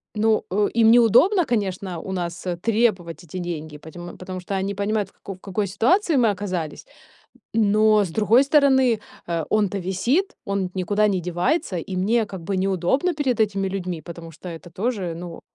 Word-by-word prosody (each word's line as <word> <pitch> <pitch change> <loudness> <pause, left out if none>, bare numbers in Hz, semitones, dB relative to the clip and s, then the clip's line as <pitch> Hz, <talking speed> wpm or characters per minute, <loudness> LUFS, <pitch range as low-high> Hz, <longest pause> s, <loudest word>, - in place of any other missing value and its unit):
ну, 220 +1 +2
э, 205 +2 +2
им 225 -1 +6
неудобно, 245 - +5
конечно, 195 - -2
у 190 - -7
нас, 175 -2 -4
э, 180 -1 -1
требовать 195 -5 0
эти 175 +2 -8
деньги, 160 -4 -5
поте 160 +3 -11 0.2
потому 185 0 -6
что 180 - -6
они 195 +1 -2
понимают, 205 0 -1
в - - -29
како 195 - -9
в - - -22
какой 200 +1 -2
ситуации 285 - +2
мы 235 -3 +4
оказались. 185 -6 -4 0.7
Но 215 -1 +4
с 180 - -5
другой 220 +8 +4
стороны, 265 -5 +4 0.3
э, 170 -2 -2
он-то 205 -2 +1
висит, 235 - 0
он 200 -2 -1
ведь 180 - -12
никуда 205 +3 +2
не 190 -3 0
девается, 180 - -1
и 185 +3 -5
мне 215 +5 +1
как 190 -4 -8
бы 190 +3 -2
неудобно 195 - +1
перед 265 -6 0
этими 200 -2 +1
людьми, 180 -4 -4
потому 170 +1 -9
что 165 +3 -10
это 165 +1 -9
тоже, 195 -2 -2
ну 170 -1 -8
195 Hz, 185 wpm, -23 LUFS, 180-225 Hz, 0.7 s, им